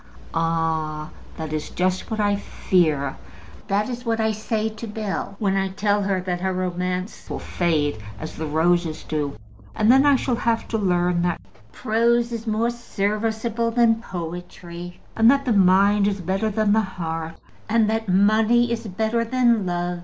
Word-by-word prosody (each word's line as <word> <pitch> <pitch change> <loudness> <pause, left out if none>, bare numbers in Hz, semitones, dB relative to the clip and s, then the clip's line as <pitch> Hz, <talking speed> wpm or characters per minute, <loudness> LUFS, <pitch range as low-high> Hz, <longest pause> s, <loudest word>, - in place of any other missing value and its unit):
"Ah; 160 -2 -1 0.3
that 155 -1 -5
is 155 -1 -3
just 185 +1 -1
what 220 -1 -3
I 205 -1 +2
fear. 155 -8 0 0.5
That 205 +2 +1
is 245 -1 -5
what 230 -2 -1
I 220 0 +2
say 215 +1 -2
to 220 +1 -7
Bell 210 -2 -4
when 195 -2 0
I 195 0 +1
tell 205 +2 0
her 195 -1 0
that 180 -1 -3
her 190 0 0
romance 180 +1 -3
will - - -3
fade 150 -8 0 0.2
as 155 - -7
the 160 - -4
roses 160 +1 +1
do. 145 -6 -3 0.4
And 215 +2 +4
then 265 +1 +6
I 285 - +6
shall 250 -2 0
have 230 -1 0
to 225 - 0
learn 180 -3 +1
that 175 -1 0 0.3
prose 235 - +1
is 230 0 -5
more 220 +2 +1
serviceable 225 +1 -1
than 230 -1 +3
poetry, 175 -1 -7 0.2
and 225 +1 +6
that 275 +1 +3
the 245 - +2
mind 200 +1 +4
is 200 -1 -1
better 190 +5 -1
than 215 0 +2
the 220 - +4
heart, 165 -4 -5 0.3
and 230 +2 +3
and 215 - +2
that 225 -2 -2
money 215 +5 +4
is 230 -1 -3
better 220 +4 0
than 235 -4 +2
love. 175 0 -2
200 Hz, 175 wpm, -23 LUFS, 175-225 Hz, 0.5 s, then